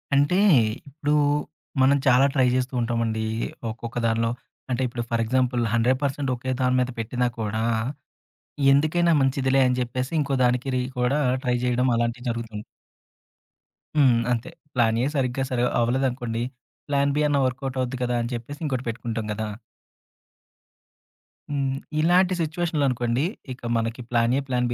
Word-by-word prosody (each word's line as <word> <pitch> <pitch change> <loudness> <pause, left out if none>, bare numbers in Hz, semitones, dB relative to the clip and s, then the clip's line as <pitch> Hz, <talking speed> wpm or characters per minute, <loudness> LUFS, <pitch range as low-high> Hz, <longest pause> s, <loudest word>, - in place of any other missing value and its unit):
అంటే 145 +7 +3 0.5
ఇప్పుడు 150 +1 -2 0.7
మనం 135 +2 +5
చాలా 130 +1 +6
ట్రై 130 -3 +3
జేస్తూ 130 +1 -1
ఉంటామండి. 115 -2 -1 0.5
ఒక్కొక్క 115 +1 -7
దానిలో 115 0 +1 0.4
అంటే 125 +1 0
ఇప్పుడు 120 -1 -4
ఫర్ 115 -1 +1
ఎగ్జాంపుల్ 125 0 +1
100% 130 +4 +1
ఒకే 130 +2 -4
దాని 125 0 +2
మీద 125 0 +1
పెట్టినా 125 +2 0
కూడా, 110 0 -1 1.1
ఎందుకైనా 155 +4 +3
మంచిదిలే 135 0 +2
అని 125 0 +1
జెప్పేసి 125 +2 -3
ఇంకో 140 -1 -1
దానికి 125 +2 +1
రి 125 - +1 0.2
కూడా 125 +4 +2 0.2
ట్రై 125 -1 +2
చేయడం 125 +1 +2
అలాంటియి 120 +2 -2
జరుగుతుంది. 115 -2 -5 1.3
హ్మ్. 125 -5 +5
అంతే. 115 -1 -2 0.2
ప్లాన్ 115 -2 +3
ఏ - - +2
సరిగ్గా 135 -1 0
సరి 125 -1 0 0.2
అవ్వలేదనుకోండి, 120 -1 0 0.4
ప్లాన్ 140 -1 +2
బీ - - +2
అన్న 145 -1 +2
వర్క్ 130 +1 -2
ఔట్ 135 0 -5
అవుద్ది 130 +1 -2
కదా! 125 0 0
అని 120 +2 -3
చెప్పేసి 120 +5 -6
ఇంకోటి 130 -3 -2
పెట్టుకుంటాం 115 -1 -4
గదా! 110 +1 -3 2.0
హ్మ్. 135 -2 -1 0.2
ఇలాంటి 180 +3 +4
సిట్యుయేషన్లనుకోండి 145 -7 0 0.3
ఇక 125 - -16 0.2
మనకి 115 +2 -2
వర్క్ 125 +4 +1
అవుట్ 125 0 0
125 Hz, 140 wpm, -24 LUFS, 120-135 Hz, 2.0 s, చాలా